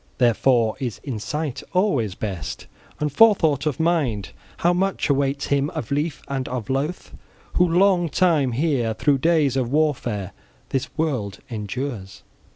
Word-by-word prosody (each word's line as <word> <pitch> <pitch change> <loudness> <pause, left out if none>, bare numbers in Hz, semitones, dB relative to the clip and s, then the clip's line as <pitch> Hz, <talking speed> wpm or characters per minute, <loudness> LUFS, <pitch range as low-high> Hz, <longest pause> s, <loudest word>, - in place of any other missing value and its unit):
Therefore 120 -1 +3
is 125 -6 -4
insight 140 +3 -3
always 140 - +1
best, 95 -9 -5 0.3
and 150 -1 -1
forethought 160 - +4
of 145 - -2
mind. 150 - 0 0.3
How 175 +1 +2
much 190 -3 0
awaits 140 0 0
him 140 +1 +2
of 155 -2 -5
lief 150 +2 -1
and 135 -2 -3
of 125 -2 -4
loath, 145 +7 -3 0.4
who 180 0 +3
long 175 -1 +3
time 150 -8 +2
here, 125 -5 0
through 140 +2 +2
days 155 -3 +2
of 125 -2 -1
warfare 125 - 0 0.4
this 135 - -1
world 130 -11 -1
endures! 110 -1 -5
140 Hz, 140 wpm, -23 LUFS, 120-160 Hz, 0.4 s, forethought